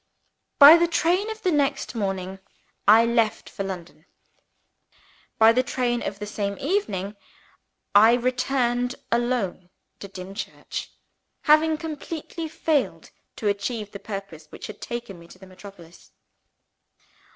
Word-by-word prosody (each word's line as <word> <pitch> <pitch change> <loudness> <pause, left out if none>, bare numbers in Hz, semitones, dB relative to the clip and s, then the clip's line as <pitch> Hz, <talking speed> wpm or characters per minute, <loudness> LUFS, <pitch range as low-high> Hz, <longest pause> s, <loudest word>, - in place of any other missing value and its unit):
By 295 +3 +11
the 340 0 +2
train 350 +5 +1
of 440 0 -7
the 370 - +2
next 285 -5 0
morning, 195 -3 -3 0.5
I 220 +3 +7
left 230 -2 0
for 195 - -5
London. 175 -4 -8 1.3
By 220 0 +7
the 250 +2 +3
train 245 -2 -1
of 200 - -4
the 210 - -6
same 200 -1 -3
evening, 215 - -2 0.8
I 220 +3 +7
returned 250 0 0 0.2
alone 235 -7 -1 0.3
to 200 - -8
Dimchurch; 195 +1 -7 0.5
having 310 +1 +4
completely 320 +1 -6
failed 305 -3 -1 0.2
to 215 - -3
achieve 205 +1 -2
the 200 - -8
purpose 195 -7 -8
which - - -8
taken 235 -7 -6
me 170 - -15
to 185 - -15
the 190 - -14
metropolis. 185 -2 -14
225 Hz, 125 wpm, -24 LUFS, 195-275 Hz, 1.3 s, By